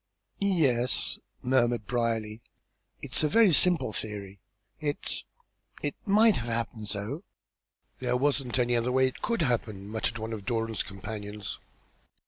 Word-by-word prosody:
"Yes," 145 -11 +3 0.2
murmured 120 -3 +2
Brierly, 115 -2 -1 0.6
"it - - -3
is - - +4
a 150 - +3
very 220 -1 +5
simple 170 -8 +4
theory. 100 -2 -5 0.4
It 145 -1 -3 0.6
it - - 0
might 215 +2 +5
have 120 -1 -4
happened 115 -2 -3
so." 110 - -4 0.8
"There 125 -1 +1
wasn't 135 -2 +1
any 120 -1 +2
other 120 +1 +1
way 130 +1 +4
it 130 - -3
could 230 -7 +1
happen," 110 -7 -1
muttered 110 +2 -2
one 110 0 -4
of 105 -3 -5
Doran's 115 -1 -1
companions. 105 0 -6
120 Hz, 135 wpm, -29 LUFS, 110-135 Hz, 0.8 s, very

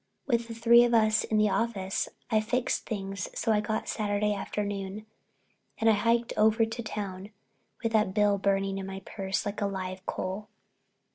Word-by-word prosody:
With 235 -3 +1
three 235 +1 +7
of 240 -1 +3
us 215 -1 +3
in 215 - 0
the 210 -1 +3
office 195 -2 -1 0.2
I 215 -1 +4
fixed 245 +3 -1
things 195 -4 -4
so 225 - +1
I 210 -1 +3
got 215 +1 -2
Saturday 210 -1 0
afternoon 200 0 -4 0.7
and 225 0 +4
I - - +5
hiked 230 +3 +1
over 220 +1 +4
to 225 +2 -5
town 200 -3 -5 0.5
with 230 - 0
that 210 -3 +2
bill 205 -1 +3
burning 195 0 0
in 190 - -5
my 195 0 -6
purse 195 -2 -3
like 205 0 -4
a 200 - +2
live 185 -1 -5
coal. 190 +3 -3
210 Hz, 170 wpm, -29 LUFS, 195-225 Hz, 0.7 s, three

